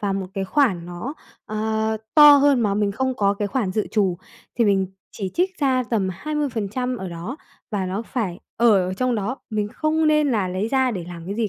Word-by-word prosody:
vào 200 -2 -1
một 195 -1 -3
cái 195 -1 -1
khoản 190 - +1
nó, 175 +11 -6 0.3
ờ, 220 0 -1 0.2
to 295 -1 +10
hơn 280 -3 +4
mà 205 -3 +1
mình 205 -1 +1
không 260 +3 -1
có 200 0 +2
cái 205 0 -2
khoản 200 -5 -1
dự 215 - -1
trù, 195 -5 +1 0.4
thì 235 - +4
mình 195 -2 +2 0.3
chỉ 195 -3 -4
trích 370 +1 0
ra 260 -3 +2
tầm 205 -5 +1
20% 250 - -2
ở 190 -3 -5
đó 175 - -6 0.3
và 195 -3 -1
nó 195 +4 -3
phải 215 -8 -3 0.2
ở 210 -6 +4
ở 185 - -3
trong 255 +4 0
đó, 220 +5 -2
mình 210 -1 -1
không 310 +5 0
nên 300 -1 +3
là 205 -6 0
lấy 190 +5 -2
ra 260 -1 +2
để 185 -7 -4
làm 170 -1 -9
cái 200 - -3
gì 225 -2 0
215 Hz, 220 wpm, -22 LUFS, 195-260 Hz, 0.4 s, to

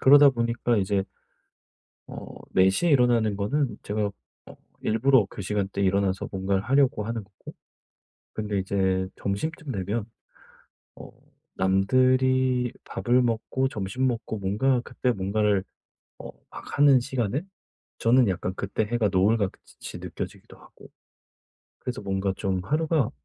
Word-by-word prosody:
그러다 145 +1 +8
보니까 120 -1 0
이제 95 -1 +1 1.1
어 - - -8 0.3
4:00 95 - +3
에 - - +3
일어나는 120 -6 +3
거는 110 +3 -1
제가 105 0 -1 0.4
어 - - -13 0.3
일부러 115 +1 +3
그 - - -8
시간대에 100 0 -2
일어나서 95 0 +1
뭔가를 95 0 -1
하려고 130 -3 +2
하는 115 0 -3
거고 100 -1 -14 0.8
근데 105 -2 -3
이제 95 -1 0
점심쯤 150 +9 -3
되면 100 +1 -2 0.9
어 - - -11 0.4
남들이 130 +5 +2
밥을 125 +1 +1
먹고 120 +3 0
점심 110 +3 -2
먹고 115 -3 -3
뭔가 120 +7 +1
그때 125 - -1
뭔가를 100 -1 +1 0.6
어 - - -8 0.2
막 - - -8
하는 140 -3 +6
시간에 125 +1 -2 0.6
저는 120 0 +4
약간 90 0 -2
그때 100 +3 -2
해가 115 -1 0
노을같이 95 - -1
느껴지기도 - - -8
하고 - - -17 0.9
그래서 125 -3 -5
뭔가 95 -1 -1
좀 95 -2 -1
하루가 155 - +1
110 Hz, 270 characters per minute, -26 LUFS, 100-130 Hz, 1.1 s, 그러다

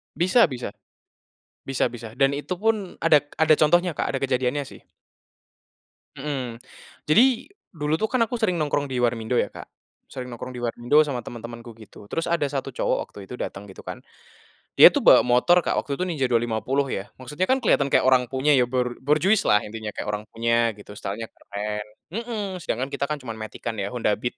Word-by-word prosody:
Bisa 185 +7 +4
bisa, 125 -7 -5 0.9
bisa 135 -2 0
bisa 115 -2 -9
dan 135 +2 +3
itu 145 +6 -3
pun 205 0 -1
ada 155 -3 +4 0.2
ada 160 0 +6
contohnya 175 +2 +3
Kak - - -1
ada - - -1
kejadiannya 130 +1 0
sih. - - -12 1.4
Mhm, 135 -4 -4 0.5
jadi, 240 - +4 0.3
dulu 155 +1 -1
tuh 220 - +1
kan 250 0 +2
aku 235 +1 -3
sering 205 -6 +1
nongkrong 145 -3 0
di 125 -2 -2
warmindo 115 0 0
ya - - +1
Kak, - - -10 0.4
sering 125 -1 -7
nongkrong 125 +2 -7
di 120 - -6
warmindo 120 +6 +3
sama 140 -5 -3
teman-temanku 115 -1 -9
gitu 110 -2 -14
terus 165 - -2
ada 170 -4 0
1 135 -1 -4
cowok - - 0
waktu 100 -1 -12
itu 125 - -7
datang 100 -4 -6
gitu 95 - -12
kan, - - -7 0.8
dia - - +10
tuh - - 0
bawa - - +7
motor 125 +9 +4
Kak - - 0
waktu 140 - -2
itu 180 - -4
Ninja 160 -7 0
250 120 +3 0
ya 95 -3 -3 0.2
maksudnya 150 +8 -2
kan 260 +3 +1
kelihatan 145 - +3
kayak 140 - +3
orang 130 -1 +4
punya 130 +4 0
ya 130 -4 +5
bor 125 0 -2
borjuislah 150 - +3
intinya 105 0 -7
kayak - - -4
orang 105 0 -3
punya 115 +1 +1
gitu 105 0 -14
style-nya 105 +3 -5
keren, 105 +1 -5 0.3
mhm, 215 -5 -4
sedangkan 135 -5 -3
kita 140 0 -2
kan 150 - -2
cuman 115 -3 -7
matic-an 110 +1 -6
ya 100 - -1
Honda 110 -4 0
Beat 120 +2 -3
130 Hz, 190 wpm, -24 LUFS, 115-155 Hz, 1.4 s, dia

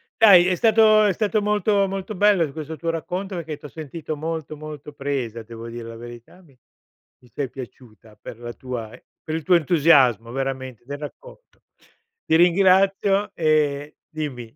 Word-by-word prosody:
Dai, 190 -5 +7
è 185 - +2
stato 215 +1 +5
è 200 - +2
stato 215 +3 0
molto 205 -1 +1
molto 195 +2 -5
bello 190 -6 +3
questo 155 0 -7
tuo 165 -1 -2
racconto 185 +4 -4
perché 160 -3 -5
t'ho 150 - -11
sentito 155 +1 -6
molto, 155 0 -5
molto 150 -1 -9
presa, 135 -5 -3
devo 115 +1 -10
dire 115 0 -8
la 115 - -9
verità. 120 +8 -12
Mi 140 -6 -23 0.7
mi 125 - -20
sei 140 -3 -3
piaciuta 115 -4 -12
per 115 - -9
la 120 0 -7
tua, 120 -4 -6
ehm, 125 - -13 0.2
per 155 - -4
il 160 - -4
tuo 180 -1 +4
entusiasmo, 140 - +3
veramente, 130 -3 -4
del 140 +2 -6
racconto. - - -12 0.6
Ti - - +2
ringrazio 195 +3 +3
e 150 -2 0
dimmi. 130 -7 -6
155 Hz, 165 wpm, -22 LUFS, 130-185 Hz, 0.7 s, Dai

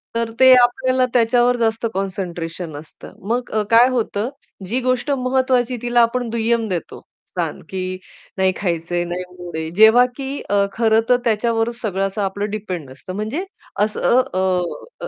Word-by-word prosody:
तर 230 -1 -1
ते 260 0 +8
आपल्याला 255 +1 +3
त्याच्यावर 245 +1 +3
जास्त 225 0 0
कॉन्सन्ट्रेशन 175 -4 -4
असतं. 155 +1 -12 0.2
मग 245 +1 -1
अ, 215 -1 +1
काय 235 +2 +7
होतं 230 -2 -1 0.4
जी 240 +7 0
गोष्ट 255 +3 0
महत्त्वाची 255 -1 +1
तिला 240 0 +3
आपण 235 0 +1
दुय्यम 230 0 0
देतो 175 -3 -5 0.3
स्थान, 170 -4 -4
की 185 -1 -4 0.4
नाही 190 0 +3
खायचंय. 175 -1 -1
नाही 175 +1 -4 0.2
मूड 175 -2 -8
आहे. 160 0 -3
जेव्हा 220 +4 +7
की 275 0 -4
अ, 200 0 +3
खरं 225 -1 +3
तर 250 - +5
त्याच्यावरच 230 +1 0
सगळं 195 -3 -1
असं 200 +2 -4
आपलं 200 +1 -2
डिपेंड 185 -9 -5
नसतं 135 +7 -9
म्हणजे 220 - -3 0.4
असं 215 +4 +3
अ, 185 - 0 0.6
अ, - - -3
220 Hz, 160 wpm, -20 LUFS, 190-245 Hz, 0.6 s, ते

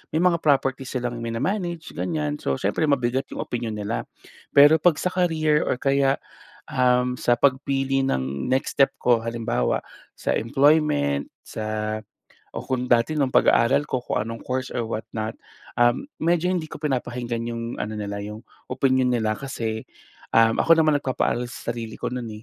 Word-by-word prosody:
may - - +3
mga 170 -2 +3
property 135 -3 +1
silang 120 -2 -3
mina-manage, 170 - -2
ganyan. 150 -3 -2
So, 70 - -1
siyempre 105 +10 0
mabigat 130 -1 +1
'yong - - -6
opinyon 115 -3 -4
nila. 105 +2 -3 0.5
Pero 145 +3 +8
'pag 170 -1 +4
sa 180 - -1
career 155 -4 +2
or - - +1
kaya, 135 0 +2 0.6
um, 125 0 +2
sa 120 - +3
pagpili 135 0 +1
ng 70 - -2
next 130 - 0
step 135 0 +6
ko 120 -2 +3
halimbawa, 115 - -1 0.4
sa - - -1
employment, 115 - +2 0.2
sa 110 0 -3 0.5
o - - -4
kung 125 -1 -2
dati 120 +5 +2
nung 135 -3 +1
pag-aaral 135 +5 +4
ko, 125 -1 -2
kung 105 - -1
anong 115 +2 -5
course 130 0 -2
or 120 - -1
what 110 0 -5
not, 110 +1 -2 0.5
um, 120 - +3 0.2
medyo 175 +2 +2
hindi 165 -4 -2
ko - - -8
pinapakinggan 120 -5 -3
'yong 115 0 -5
ano 110 +1 -3
nila 100 -1 -4
'yong 105 +3 -8 0.2
opinyon 130 -1 +2
nila. 110 -3 +1
Kasi, 115 -5 -3 0.6
um, 115 0 +5
ako 165 0 +5
naman 155 -3 +3
nagpapaaral 125 -2 -1
sa 120 0 -5
sarili 115 -1 -7
ko - - -4
no'n, 125 -2 -4
125 Hz, 165 wpm, -24 LUFS, 115-140 Hz, 0.6 s, Pero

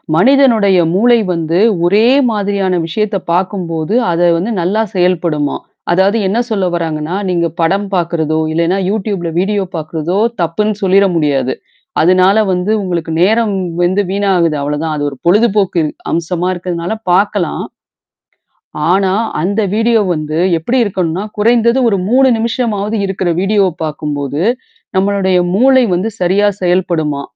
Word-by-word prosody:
மனிதனுடைய 225 -3 +4 0.2
மூளை 240 +4 +4 0.2
வந்து 165 +1 -1 0.3
ஒரே 205 +6 +3 0.2
மாதிரியான 200 -3 -1
விஷயத்த 210 +4 -1
பார்க்கும்போது, 175 -1 -2 0.2
அத 170 0 -1 0.2
வந்து 190 +8 -2
நல்லா 195 +6 0
செயல்படுமாம். 170 -5 0 0.3
அதாவது 190 +5 +2
என்ன 200 +4 -1
சொல்ல 200 -4 0
வராங்கன்னா, 160 0 -3
நீங்க 170 -2 0
படம் 195 +5 0
பார்க்கறதோ, 160 -3 -1
இல்லன்னா 170 +3 +1
YouTube 200 -3 -2
வீடியோ 200 +2 0
பார்க்கறதோ 160 +3 -3 0.2
தப்புன்னு 210 +6 -1
சொல்லிற 195 +1 +4
முடியாது. 140 -5 0 0.5
அதனால 185 +4 +4 0.2
வந்து 180 +3 -1
உங்களுக்கு 170 -3 -3
நேரம் 220 +3 +2 0.3
வந்து 185 +3 +2
வீணாகுது 190 -5 +1
அவ்வளோதான். 150 +2 -2
அது 145 - -3
ஒரு 140 - -10
பொழுதுபோக்கு 205 -2 +2 0.3
அம்சமா 170 +1 -2
இருக்கிறதுனால 175 +1 -4 0.2
பார்கலாம். 195 -2 0 1.3
ஆனா, 190 0 +2 0.3
அந்த 200 +5 0
வீடியோ 225 +1 +2
வந்து 155 0 -3 0.2
எப்படி 235 +11 -1
இருக்கணும்னா, 185 -3 -2 0.2
குறைந்தது 235 +3 +3
ஒரு 200 - +1
3 265 +2 +4
நிமிஷமாவது 225 -2 -2
இருக்கிற 190 -1 -2
வீடியோவ 195 0 +2 0.2
பார்க்கும்போது, 150 -1 -3 0.5
நம்மளுடைய 190 -1 +1 0.2
மூளை 260 +5 +4
வந்து 185 +5 -1
சரியா 190 +3 +2
செயல்படுமா. 170 -5 0
185 Hz, 125 wpm, -14 LUFS, 170-205 Hz, 1.3 s, மனிதனுடைய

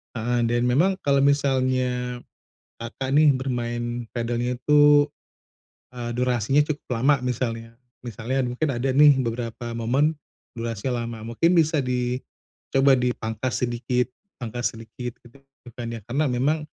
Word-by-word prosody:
Heeh, 120 +1 0
dan 120 +1 +1
memang 175 +10 +3
kalau 140 -1 +3
misalnya 130 -3 +1 0.6
Kakak, 120 +3 -5
nih 150 +1 +6
bermain 120 -2 -3
padelnya 120 +1 -1
itu 145 +2 +5 0.9
eee, 120 -1 -4
durasinya 125 +1 +2
cukup 150 -1 -4 0.2
lama 140 0 +3
misalnya 115 -2 -3 0.3
misalnya 120 +3 -2
mungkin 125 +5 -2
ada 125 +3 -1
nih 145 +2 +7
beberapa 115 0 -4
momen 135 +7 +1 0.4
durasinya 115 +1 -3
lama, 115 -1 -7
mungkin 165 +9 +3
bisa 160 -2 +3
dicoba 125 +2 0
dipangkas 120 -1 -2
sedikit, 125 +1 -1 0.3
pangkas 120 +1 -2
sedikit 115 +2 -8
gitu 120 +3 -18 0.4
kan 115 -1 -5
ya, 115 - -6
karena 145 +6 +1
memang 140 +5 0
125 Hz, 125 wpm, -24 LUFS, 120-135 Hz, 0.9 s, nih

